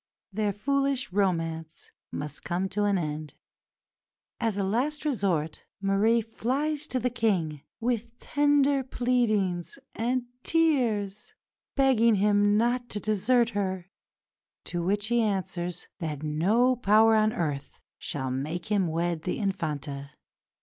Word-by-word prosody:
Their 210 Hz, 0 st, 0 dB
foolish 275 Hz, +1 st, 0 dB
romance 165 Hz, -5 st, -1 dB, 0.2 s
must 150 Hz, +1 st, -6 dB
come 180 Hz, +2 st, -1 dB
to 205 Hz, +1 st, 0 dB
an 200 Hz, -1 st, +2 dB
end. 155 Hz, -2 st, -4 dB, 1.0 s
As 225 Hz, -4 st, 0 dB
a 200 Hz, -, +1 dB
last 265 Hz, +10 st, 0 dB
resource 190 Hz, -, 0 dB, 0.2 s
Marie 205 Hz, +4 st, +3 dB
flies 280 Hz, +7 st, -2 dB
to 255 Hz, -, -1 dB
the 250 Hz, +1 st, 0 dB
King, 180 Hz, -, 0 dB, 0.2 s
with 235 Hz, 0 st, -2 dB
tender 285 Hz, -1 st, +2 dB
pleadings 220 Hz, -9 st, 0 dB, 0.2 s
and 245 Hz, +2 st, 0 dB, 0.2 s
tears, 255 Hz, -, +1 dB, 0.4 s
begging 240 Hz, -5 st, +4 dB
him 205 Hz, +1 st, +3 dB
not 240 Hz, +2 st, +1 dB
to 205 Hz, -, -3 dB
desert 220 Hz, +4 st, +2 dB
her; 190 Hz, -3 st, -3 dB, 0.7 s
to 175 Hz, -, -3 dB
which 200 Hz, +4 st, 0 dB
he 240 Hz, 0 st, +3 dB
answers 185 Hz, -4 st, -2 dB
that 155 Hz, -3 st, -4 dB
no 205 Hz, +12 st, +3 dB
power 225 Hz, -1 st, +5 dB
on 215 Hz, 0 st, +4 dB
earth 145 Hz, -7 st, -3 dB, 0.2 s
shall 130 Hz, -3 st, -3 dB
make 155 Hz, +10 st, -4 dB
him 200 Hz, -4 st, +2 dB
wed 165 Hz, 0 st, -1 dB
the 180 Hz, -, -2 dB
Infanta. 150 Hz, -, -3 dB
205 Hz, 125 wpm, -27 LUFS, 175-240 Hz, 1.0 s, power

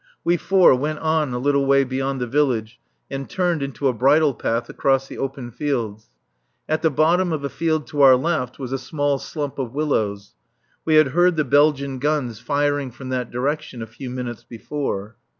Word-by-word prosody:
We 175 Hz, -, +3 dB
four 185 Hz, -1 st, +5 dB
went 150 Hz, +4 st, -1 dB
on 155 Hz, -3 st, 0 dB
a 125 Hz, -, -2 dB
little 140 Hz, +2 st, +1 dB
way 140 Hz, 0 st, +5 dB
beyond 135 Hz, +1 st, -2 dB
the 125 Hz, -, -1 dB
village 120 Hz, -4 st, 0 dB, 0.3 s
and 135 Hz, 0 st, -5 dB
turned 175 Hz, -4 st, 0 dB
into 140 Hz, 0 st, -2 dB
a 130 Hz, -, +2 dB
bridle 140 Hz, +5 st, +3 dB
path 115 Hz, +1 st, -2 dB
across 135 Hz, -1 st, +1 dB
the -, -, -9 dB
open 135 Hz, -3 st, -4 dB
fields. 115 Hz, -6 st, -3 dB, 0.6 s
At 155 Hz, 0 st, 0 dB
the 160 Hz, -, +3 dB
bottom 165 Hz, +5 st, +2 dB
of 155 Hz, -3 st, -2 dB
a 140 Hz, -, -2 dB
field 155 Hz, -1 st, -1 dB
to 145 Hz, -, -1 dB
our 135 Hz, -2 st, +8 dB
left 130 Hz, -3 st, -1 dB
was 130 Hz, -2 st, -6 dB
a 135 Hz, -, -1 dB
small 145 Hz, +1 st, -1 dB
slump 145 Hz, -2 st, -5 dB
of 130 Hz, -1 st, -4 dB
willows; 105 Hz, -9 st, -1 dB, 0.5 s
we 155 Hz, -, +3 dB
had 155 Hz, -3 st, +6 dB
heard 175 Hz, +5 st, +3 dB
the 155 Hz, -2 st, +1 dB
Belgian 140 Hz, -1 st, +2 dB
guns 135 Hz, -6 st, -1 dB
firing 145 Hz, 0 st, 0 dB
from 130 Hz, +2 st, -10 dB
that 125 Hz, -2 st, -2 dB
direction 140 Hz, 0 st, -3 dB
a -, -, -5 dB
few 125 Hz, +4 st, -9 dB
minutes 125 Hz, -2 st, -5 dB
before. 115 Hz, -4 st, -5 dB
140 Hz, 190 wpm, -22 LUFS, 125-150 Hz, 0.6 s, our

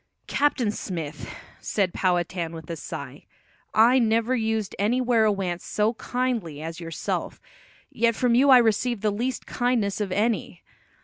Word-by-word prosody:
"Captain 275 Hz, -6 st, +1 dB
Smith," 165 Hz, -8 st, -6 dB, 0.3 s
said 195 Hz, -4 st, -1 dB
Powhatan 175 Hz, -2 st, -1 dB
with 160 Hz, -2 st, -9 dB
a -, -, -3 dB
sigh, 150 Hz, -, -8 dB, 0.5 s
"I 235 Hz, +4 st, +5 dB
never 230 Hz, +2 st, +2 dB
used 220 Hz, -3 st, -1 dB
any 220 Hz, +5 st, +2 dB
werowance 210 Hz, -8 st, +1 dB
so 215 Hz, +2 st, 0 dB
kindly 235 Hz, -, -2 dB
as 165 Hz, +2 st, -6 dB
yourself, 165 Hz, -2 st, -4 dB, 0.5 s
yet 230 Hz, 0 st, +1 dB
from 245 Hz, 0 st, +2 dB
you 265 Hz, +4 st, +5 dB
I 260 Hz, -, +9 dB
receive 235 Hz, -1 st, +2 dB
the 210 Hz, -1 st, +1 dB
least 245 Hz, +5 st, -3 dB
kindness 230 Hz, -5 st, 0 dB
of 200 Hz, -3 st, -2 dB
any. 215 Hz, +4 st, -1 dB
220 Hz, 140 wpm, -25 LUFS, 185-240 Hz, 0.5 s, I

